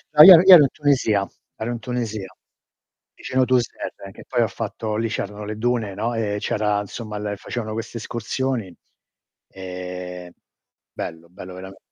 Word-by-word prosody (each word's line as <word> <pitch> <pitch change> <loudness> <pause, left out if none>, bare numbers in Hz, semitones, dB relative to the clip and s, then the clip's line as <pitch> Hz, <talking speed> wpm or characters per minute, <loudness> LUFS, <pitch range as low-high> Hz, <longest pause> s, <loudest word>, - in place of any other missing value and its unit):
No, 150 - +11
io 190 +1 +12
ero 170 +1 +8
ero 180 -5 +10
in 135 - +2
Tunisia, 120 -9 +1 0.3
ero 115 +2 -4
in 120 - -4
Tunisia, 115 -6 -4 0.9
vicino 130 0 0
Touzer, 125 -2 -1 0.2
che - - -13
poi 120 -2 0
ho 115 - +3
fatto 110 0 -4
lì 115 +1 0
c'erano 105 -1 -5
le 105 0 -5
dune, 115 -4 -1
no, 115 +4 -2
e 105 -2 -1
c'era 105 0 0
insomma 105 +1 -7
la 105 0 -3
facevano 110 +1 -5
queste 115 +1 -5
escursioni. 115 -3 -3 0.8
E 90 -1 -7 0.6
bello, 80 +1 -7
bello 90 0 -10
verame 95 +1 -10
110 Hz, 155 wpm, -22 LUFS, 100-120 Hz, 0.9 s, io